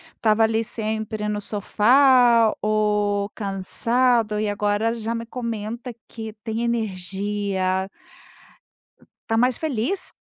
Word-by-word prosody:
estava 220 Hz, 0 st, +2 dB
ali 220 Hz, 0 st, +2 dB
sempre 215 Hz, -1 st, -3 dB
no 210 Hz, 0 st, -2 dB
sofá 235 Hz, +3 st, +4 dB
ou 210 Hz, -1 st, +1 dB
cansado 220 Hz, +3 st, 0 dB
e 215 Hz, -, 0 dB
agora 205 Hz, +2 st, 0 dB
já 230 Hz, 0 st, -3 dB
me 230 Hz, 0 st, -4 dB
comenta 235 Hz, 0 st, -5 dB, 0.2 s
que 220 Hz, -1 st, -8 dB
tem 225 Hz, 0 st, -3 dB
energia. 195 Hz, -3 st, -2 dB, 1.4 s
Tá 225 Hz, -1 st, +1 dB
mais 250 Hz, 0 st, +2 dB
feliz? 305 Hz, -, -2 dB
220 Hz, 105 wpm, -23 LUFS, 205-235 Hz, 1.4 s, sofá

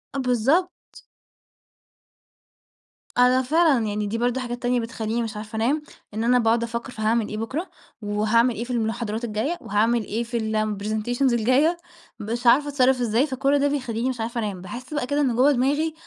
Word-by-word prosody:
آه 275 Hz, -, -1 dB
بالضبط. 265 Hz, +9 st, 0 dB, 2.2 s
أنا 250 Hz, +1 st, +5 dB
فعلًا، 290 Hz, -4 st, +3 dB
يعني 210 Hz, 0 st, -2 dB
دي 225 Hz, +3 st, -2 dB
برضه 245 Hz, +2 st, 0 dB
حاجات 240 Hz, -1 st, -5 dB
تانية 245 Hz, 0 st, +2 dB
بتخلّيني 230 Hz, 0 st, -3 dB
مش 215 Hz, -2 st, -5 dB
عارفة 215 Hz, +1 st, -8 dB
أنام، 265 Hz, +8 st, +1 dB, 0.3 s
إن 220 Hz, +1 st, -2 dB
أنا 250 Hz, +1 st, +4 dB
باقعُد 230 Hz, 0 st, +2 dB
أفكّر 235 Hz, +2 st, -4 dB
في 220 Hz, -, -8 dB
هاعمل 220 Hz, 0 st, +1 dB
إيه 215 Hz, -, -5 dB
بكرة؟ 270 Hz, +11 st, -4 dB, 0.3 s
وهاعمل 215 Hz, +4 st, +2 dB
إيه 235 Hz, -, -3 dB
في 250 Hz, -, -7 dB
المحاضرات 225 Hz, 0 st, -2 dB
الجاية؟ 235 Hz, +10 st, -2 dB
وهاعمل 225 Hz, +2 st, +1 dB
إيه 225 Hz, +4 st, -3 dB
في 235 Hz, 0 st, -3 dB
الpresentations 220 Hz, +3 st, -1 dB
الجاية؟ 255 Hz, +9 st, +3 dB, 0.4 s
مش 235 Hz, +3 st, -3 dB
عارفة 285 Hz, +5 st, +5 dB
أتصرَّف 265 Hz, -2 st, +2 dB
إزاي، 240 Hz, +5 st, +2 dB
فكل 275 Hz, +2 st, +1 dB
ده 285 Hz, -, +2 dB
بيخلّيني 255 Hz, -3 st, -2 dB
مش 250 Hz, -3 st, -4 dB
عارفة 235 Hz, +1 st, -3 dB
أنام. 205 Hz, -5 st, -3 dB
باحِس 245 Hz, +9 st, -8 dB
بقى 295 Hz, -4 st, -2 dB
كده 290 Hz, +2 st, 0 dB
إن 255 Hz, -5 st, +1 dB
جوّه 270 Hz, +4 st, +5 dB
دماغي 290 Hz, +5 st, +1 dB
235 Hz, 175 wpm, -24 LUFS, 220-260 Hz, 2.2 s, أنا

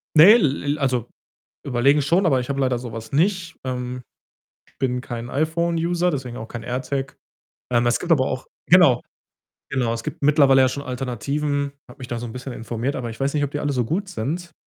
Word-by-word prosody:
Ne, 165 Hz, +7 st, +10 dB
l 150 Hz, -, +1 dB
l 145 Hz, +1 st, 0 dB
also, 125 Hz, -4 st, 0 dB, 0.6 s
überlegen 140 Hz, +3 st, +3 dB
schon, 170 Hz, +7 st, +2 dB
aber 135 Hz, -6 st, +3 dB
ich 125 Hz, -, -5 dB
habe 140 Hz, 0 st, -1 dB
leider 130 Hz, -2 st, +1 dB
so 120 Hz, -2 st, -7 dB
was 115 Hz, -1 st, -7 dB
nicht, 180 Hz, +4 st, +1 dB
ähm, 125 Hz, -1 st, -4 dB, 0.8 s
bin 125 Hz, -2 st, 0 dB
kein 120 Hz, -1 st, -6 dB
iPhone-User, 170 Hz, +3 st, 0 dB
deswegen 130 Hz, -5 st, -4 dB
auch 110 Hz, -, -7 dB
kein 120 Hz, -, -7 dB
AirTag. 130 Hz, +2 st, -3 dB, 0.6 s
Ähm, 120 Hz, 0 st, +3 dB
es 120 Hz, -, +2 dB
gibt 175 Hz, -, -3 dB
aber 140 Hz, -5 st, +4 dB
auch 130 Hz, -, -4 dB, 0.2 s
genau, 165 Hz, -9 st, +6 dB, 0.7 s
genau. 125 Hz, -4 st, 0 dB
Es 115 Hz, 0 st, -5 dB
gibt -, -, -6 dB
mittlerweile 140 Hz, -2 st, +5 dB
ja 130 Hz, -, +4 dB
schon 140 Hz, +2 st, -5 dB
Alternativen. 140 Hz, +3 st, -2 dB
Habe 140 Hz, -, -15 dB
mich 125 Hz, -, -7 dB
da 120 Hz, -2 st, -3 dB
so 120 Hz, -, -5 dB
'n 110 Hz, -, -9 dB
bisschen 125 Hz, 0 st, -6 dB
informiert, 120 Hz, +4 st, -3 dB
aber 120 Hz, -3 st, -4 dB
ich 115 Hz, -, -9 dB
weiß 135 Hz, +1 st, 0 dB
nicht, 150 Hz, -1 st, +1 dB
ob 145 Hz, -, -2 dB
die 145 Hz, -, -3 dB
alle 145 Hz, -1 st, -1 dB
so 125 Hz, -3 st, 0 dB
gut 190 Hz, -, -2 dB
sind. 170 Hz, +4 st, -4 dB
135 Hz, 210 wpm, -22 LUFS, 125-150 Hz, 0.8 s, Ne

